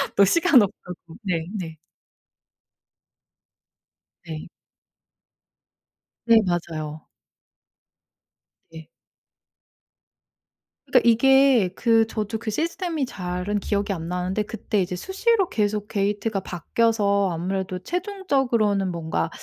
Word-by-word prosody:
너 200 - +6
시간 320 - +5
없다고. 185 -3 -4 0.3
네 165 -4 -1
네. 165 -5 -6 2.5
네. 160 -2 -7 1.8
네 230 -1 +6
맞아요. 160 -3 -3 1.7
네. 160 -1 -11 2.0
그러니까 - - +3
이게 265 -3 +5
그 225 -2 +3
저도 220 0 -3
그 225 -1 -5
시스템이 325 - -2
잘은 180 0 -3
기억이 200 0 -1
안 165 -2 -6
나는데 180 +4 -2
그때 210 -2 -2
이제 180 0 -3
수시로 390 - +1
계속 210 -1 -1
게이트가 205 +1 -1
바뀌어서 200 +1 +1
아무래도 185 +2 -3
최종적으로는 265 - 0
뭔가 160 - -2
205 Hz, 205 characters per minute, -23 LUFS, 180-230 Hz, 2.5 s, 너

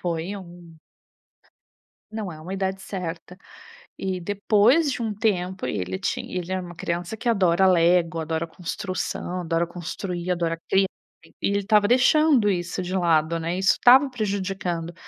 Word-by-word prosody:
Foi 175 +2 -3
um 175 -3 -12 1.3
Não 215 -3 -5
é 155 - -11
uma 180 +5 -6
idade 190 0 -2
certa. 180 -2 -6 0.6
E 190 -1 -3
depois 210 - +3
de 250 - -4
um 220 -2 -2
tempo, 190 -3 -1
e - - -2
ele 95 0 -3
ti - - -2
ele 180 0 -5
era 185 0 -1
uma 175 -1 -9
criança 175 +5 -4
que 245 - -5
adora 190 -5 +3
lego, 175 -1 +3
adora 160 +1 -2
construção, 180 +1 -4
adora 165 0 0
construir, 175 +1 -5
adora 170 -2 -1
criar, 195 0 +4 0.6
e - - +1
ele 200 0 +1
estava 205 +1 +3
deixando 255 -1 +4
isso 180 -1 -2
de 180 +1 -4
lado, 165 -2 +2
né, 165 +2 -2
isso 190 0 +4
estava 265 +3 +6
prejudicando. 195 -7 -3
185 Hz, 155 wpm, -24 LUFS, 170-200 Hz, 1.3 s, estava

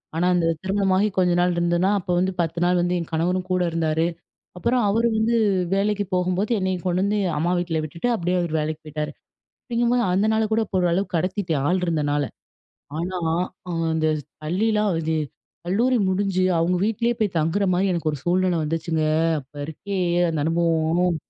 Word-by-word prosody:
ஆனா, 175 +2 +1
அந்த 170 -2 +2 0.2
திருமணமாகி 195 +1 +2
கொஞ்ச 180 -1 +3
நாள் 180 0 +2
இருந்தன்னா, 175 +2 +1
அப்போ 180 0 -4
வந்து 190 +1 +1
10 165 0 -2
நாள் 180 0 +3
வந்து 175 +1 0
என் 170 - -6
கணவரும் 180 +3 0
கூட 180 0 +2
இருந்தாரு. 160 0 0 0.5
அப்புறம் 240 +5 +1
அவரு 230 +3 +2
வந்து 230 +2 +2 0.4
வேலைக்கு 205 +1 0
போகும்போது, 185 +5 0
என்னைய 185 -1 0
கொண்டு 180 +1 +1
வந்து 205 +1 +1 0.2
அம்மா 170 +4 +1
வீட்ல 165 -3 -1
விட்டுட்டு 170 +10 -3
அப்பிடியே 180 -3 0
அவரு 170 -2 -3
வேலைக்கு 155 +1 -3
போய்ட்டாரு. 150 0 -4 0.5
அப்பிடிங்கம்போது 240 0 +1
அந்த 200 +4 +2
நாள 220 0 +2
கூட 225 - +3
இப்போ 190 - -1
ஓரளவுக்கு 175 +1 0
கடத்திட்டேன். 175 -4 -1
ஆள் 180 0 +1
இருந்தனால. 145 -3 0 0.8
ஆனா, 180 +2 -3 0.5
ஆ - - -2 0.2
அந்த 155 0 +1 0.4
பள்ளியிலாம் 210 +5 +1
அது 160 0 -1 0.5
கல்லூரி 235 +8 +2
முடிஞ்சு 190 -1 0
அவுங்க 175 +2 +1
வீட்லயே 230 +2 0
போய் 205 -5 0
தங்குறமாரி 185 +3 +1
எனக்கு 170 -3 -1
ஒரு 150 - -4
சூழ்நிலை 180 0 +1
வந்துச்சுங்க. 160 +1 -1 0.4
அப்ப 135 +3 -26
இருக்கே! 195 +6 -5 0.3
அந்த 160 - -2
அனுபவம் 165 +1 +1
180 Hz, 165 wpm, -23 LUFS, 165-200 Hz, 0.8 s, கொஞ்ச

